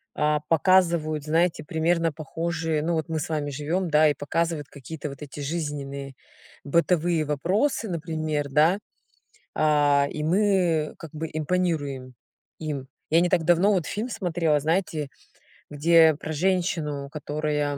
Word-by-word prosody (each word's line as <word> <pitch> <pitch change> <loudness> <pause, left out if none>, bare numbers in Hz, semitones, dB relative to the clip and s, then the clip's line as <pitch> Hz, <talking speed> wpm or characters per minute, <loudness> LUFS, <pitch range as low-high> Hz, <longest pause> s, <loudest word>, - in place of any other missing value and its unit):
А, 150 0 +1
показывают, 165 -3 +3
знаете, 165 +1 +1
примерно 165 +2 +1
похожие, 160 0 -2
ну 170 +2 0
вот 160 +1 -2
мы 160 -1 -1
с 160 - -4
вами 150 -2 -1
живём, 160 +6 -2
да 155 0 +5
и - - +2
показывают 160 0 -2
какие-то 145 +2 -7
вот 140 +1 -9
эти 145 0 -9
жизненные 140 -3 -4 0.5
бытовые 170 +1 +1
вопросы, 190 - 0
например, 155 -3 -2
да. 155 +7 +4 0.8
А. 145 -2 +3
И 150 - -4
мы 175 -3 +2
как 165 -3 -10
бы 160 +1 -4
импонируем 150 -5 -1 0.5
им. 145 -4 -4 0.2
Я 165 - +5
не 175 - +3
так 175 -2 +2
давно 175 +5 +4
вот 180 -5 0
фильм 215 +9 -3
смотрела, 170 -8 0
знаете, 160 -2 -1 0.6
где 160 +1 +5
про 155 +2 -6
женщину, 155 -5 -1
которая 150 -1 -2
155 Hz, 140 wpm, -25 LUFS, 150-170 Hz, 0.8 s, да